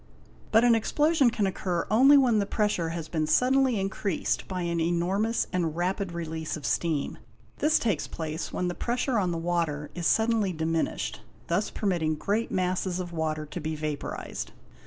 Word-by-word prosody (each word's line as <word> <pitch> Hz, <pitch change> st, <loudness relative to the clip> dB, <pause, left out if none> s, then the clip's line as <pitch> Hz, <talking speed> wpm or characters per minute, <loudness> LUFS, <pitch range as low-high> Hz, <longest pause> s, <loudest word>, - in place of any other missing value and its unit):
But 225 Hz, +1 st, +5 dB
an 240 Hz, -1 st, +6 dB
explosion 295 Hz, +4 st, +3 dB
can 215 Hz, -3 st, 0 dB
occur 180 Hz, -2 st, -1 dB
only 270 Hz, +6 st, +7 dB
when 245 Hz, -5 st, +4 dB
the 200 Hz, -, 0 dB
pressure 205 Hz, -6 st, 0 dB
has 165 Hz, -1 st, -4 dB
been 155 Hz, -2 st, -1 dB
suddenly 255 Hz, +4 st, +3 dB
increased 195 Hz, -1 st, -1 dB
by 185 Hz, -2 st, -3 dB
an 170 Hz, -1 st, -1 dB
enormous 180 Hz, +7 st, +1 dB
and 170 Hz, -4 st, 0 dB
rapid 185 Hz, +2 st, -1 dB
release 160 Hz, -2 st, -4 dB
of 145 Hz, -, -9 dB
steam; 160 Hz, -2 st, -1 dB, 0.4 s
this 305 Hz, +1 st, +4 dB
takes 205 Hz, -10 st, 0 dB
place 160 Hz, 0 st, -5 dB
when 180 Hz, -, -1 dB
the 175 Hz, -, -1 dB
pressure 240 Hz, +3 st, 0 dB
on 185 Hz, -3 st, +1 dB
the 170 Hz, -, -2 dB
water 165 Hz, -3 st, -1 dB
is 175 Hz, -2 st, -1 dB
suddenly 220 Hz, -4 st, +2 dB
diminished, 160 Hz, 0 st, -2 dB, 0.3 s
thus 180 Hz, +5 st, +1 dB
permitting 170 Hz, -6 st, 0 dB
great 205 Hz, +8 st, -1 dB
masses 185 Hz, 0 st, -1 dB
of 175 Hz, -1 st, -5 dB
water 155 Hz, -1 st, -2 dB
to 150 Hz, +4 st, -7 dB
be 155 Hz, 0 st, -3 dB
vaporised. 150 Hz, -1 st, -4 dB
180 Hz, 170 wpm, -27 LUFS, 165-215 Hz, 0.4 s, only